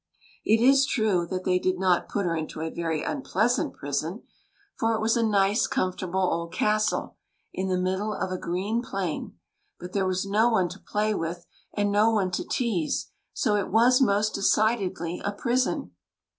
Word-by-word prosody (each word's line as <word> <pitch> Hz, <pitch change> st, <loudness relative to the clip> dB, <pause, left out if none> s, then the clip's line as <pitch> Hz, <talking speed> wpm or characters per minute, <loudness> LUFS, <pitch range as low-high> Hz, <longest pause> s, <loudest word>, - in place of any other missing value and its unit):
It 220 Hz, +1 st, +3 dB
is 275 Hz, +2 st, +5 dB
true 200 Hz, -7 st, +1 dB
that 185 Hz, +1 st, -4 dB
they 180 Hz, 0 st, +2 dB
did 185 Hz, 0 st, 0 dB
not 185 Hz, -1 st, +1 dB
put 200 Hz, -2 st, -1 dB
her 170 Hz, -1 st, 0 dB
into 155 Hz, -1 st, -5 dB
a 160 Hz, 0 st, -3 dB
very 160 Hz, -2 st, -2 dB
unpleas 245 Hz, -2 st, 0 dB
ant -, -, -3 dB
prison, 155 Hz, -, -3 dB, 0.5 s
for 225 Hz, 0 st, +1 dB
it -, -, -2 dB
was 225 Hz, +1 st, +2 dB
a 235 Hz, -, +2 dB
nice, 205 Hz, -1 st, +2 dB
comfortable 185 Hz, 0 st, -1 dB
old 170 Hz, 0 st, -3 dB
castle, 215 Hz, +3 st, 0 dB, 0.4 s
in 190 Hz, -, -2 dB
the 185 Hz, -1 st, 0 dB
middle 190 Hz, +3 st, -1 dB
of 190 Hz, -2 st, -3 dB
a 185 Hz, -, -2 dB
green 195 Hz, +7 st, -1 dB
plain; 195 Hz, -8 st, -4 dB, 0.4 s
but 180 Hz, +1 st, -9 dB
there 195 Hz, -2 st, +1 dB
was 185 Hz, +1 st, -1 dB
no 215 Hz, +4 st, +3 dB
one 190 Hz, -6 st, +2 dB
to 185 Hz, +3 st, -10 dB
play 215 Hz, +2 st, -1 dB
with 170 Hz, -1 st, -4 dB, 0.3 s
and 205 Hz, -1 st, +1 dB
no 210 Hz, +2 st, +4 dB
one 200 Hz, -5 st, +1 dB
to 180 Hz, -, -2 dB
tease, 210 Hz, -11 st, -1 dB, 0.2 s
so 210 Hz, -, 0 dB
it 200 Hz, -2 st, -1 dB
was 245 Hz, +5 st, +4 dB
most 210 Hz, -3 st, +2 dB
decidedly 195 Hz, -4 st, 0 dB
a 200 Hz, -, -1 dB
prison. 235 Hz, -, -1 dB
195 Hz, 185 wpm, -26 LUFS, 180-220 Hz, 0.5 s, is